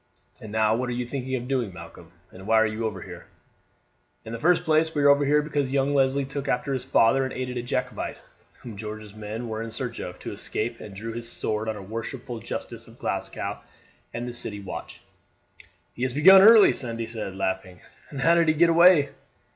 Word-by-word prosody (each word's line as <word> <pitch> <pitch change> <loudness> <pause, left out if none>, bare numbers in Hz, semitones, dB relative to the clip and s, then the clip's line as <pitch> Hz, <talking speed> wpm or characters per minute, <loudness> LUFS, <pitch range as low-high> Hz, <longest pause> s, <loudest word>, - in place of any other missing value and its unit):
And 110 - -9
now 110 0 +2
what 125 +1 -2
are - - -2
you 125 0 -3
thinking 130 +1 -4
of 125 -1 -4
doing, 125 -6 -1
Malcolm, 85 -1 -12 0.2
and 95 +2 -12
why 115 - +3
are 110 - +4
you 110 +1 -2
over 95 -4 -6
here?" - - -11 1.0
"In 110 - -7
the 115 - -5
first 175 +4 +3
place 160 0 +2
we 145 - +1
are 145 - +6
over 140 0 +5
here 150 +1 +3
because 145 -3 -1
young 135 +1 +1
Leslie 135 0 +2
took 140 +1 -5
after 135 +2 -1
his 130 -2 -3
father 135 0 +3
and 130 - -3
aided 125 -1 -4
a - - -1
Jacobite, 120 - -3 0.5
whom 115 -4 -8
George's 105 -1 -7
men 110 +2 -6
were 110 0 -4
in 115 - -5
search 115 +1 -5
of, 90 0 -6
to - - -7
escape, 115 +2 -4
and 100 -2 -10
drew 115 +3 -6
his 115 0 -5
sword 110 -1 -2
on 110 - -2
a 100 - -8
worshipful 115 +4 -6
justice - - -7
of - - -16
Glasgow - - -4 0.5
and 120 +1 -5
the 120 - -5
city 105 -3 -4
watch." 100 - -8 0.9
"He - - -10
has 130 0 -1
begun 190 +6 +8
early," 220 +1 +8
Sandy 115 -3 -3
said, 110 -4 -6
laughing; 95 -1 -3 0.3
"and 140 -2 -6
how 165 - +5
did 170 -1 +3
he 155 - +3
get 170 +2 +4
away?" 170 -4 +6
120 Hz, 215 wpm, -25 LUFS, 110-140 Hz, 1.0 s, begun